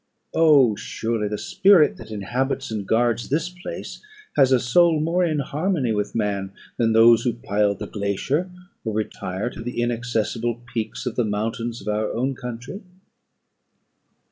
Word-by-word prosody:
Oh, 145 -8 +5
surely, 110 0 -2
the 105 0 -3
spirit 195 - +4
that - - -11
inhabits 125 +5 -2
and 105 -3 -4
guards 120 0 +1
this 155 +5 0
place 180 0 -8 0.3
has 135 -2 +5
a 130 - +5
soul 160 +7 +4
more 170 +4 +1
in 160 -3 +1
harmony 145 - -1
with 105 -1 -2
man, 100 -3 -1 0.2
than 115 -1 +2
those 115 0 +7
who 120 0 0
pile 105 -2 0
the - - -6
glacier, 110 - -2 0.3
or 110 - -3
retire 105 0 -3
to - - -9
the 120 +1 -4
inaccessible 120 0 -1
peaks 115 +2 -3
of 125 - -3
the 120 - +3
mountains 115 +2 -3
of 100 - -12
our 105 0 0
own 130 +4 0
country." 125 - -7
120 Hz, 155 wpm, -23 LUFS, 110-140 Hz, 0.3 s, those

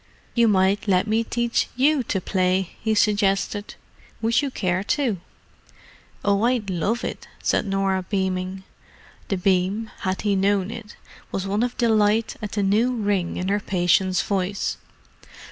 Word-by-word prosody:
"You 235 -1 +4
might 200 +1 +2
let 185 -2 +3
me 220 +1 +1
teach 235 0 0
you 280 +3 +3
to 190 - 0
play," 185 0 0
he 220 -1 +1
suggested. 205 0 +1 0.5
"Would 230 +3 +3
you 285 - -1
care 185 -6 -1
to?" 225 - 0 1.0
"Oh, 200 0 +3
I'd 235 -5 +1
love 200 +7 -1
it," - - -5 0.2
said - - +1
Norah, 195 -1 +1
beaming. 190 -1 -2 0.6
The 195 - -1
beam, 190 +4 +1
had 185 0 -2
he 205 -2 +2
known 195 +1 +1
it, 230 -2 -9 0.4
was 195 - -2
one 200 +2 0
of 245 0 -1
delight 220 -1 +2
at 210 -2 -5
the 205 - 0
new 220 +6 +2
ring 200 -6 -1
in 185 +1 -2
her 205 +1 +2
patient's 185 -1 +2
voice. 195 0 -1
200 Hz, 150 wpm, -23 LUFS, 190-220 Hz, 1.0 s, You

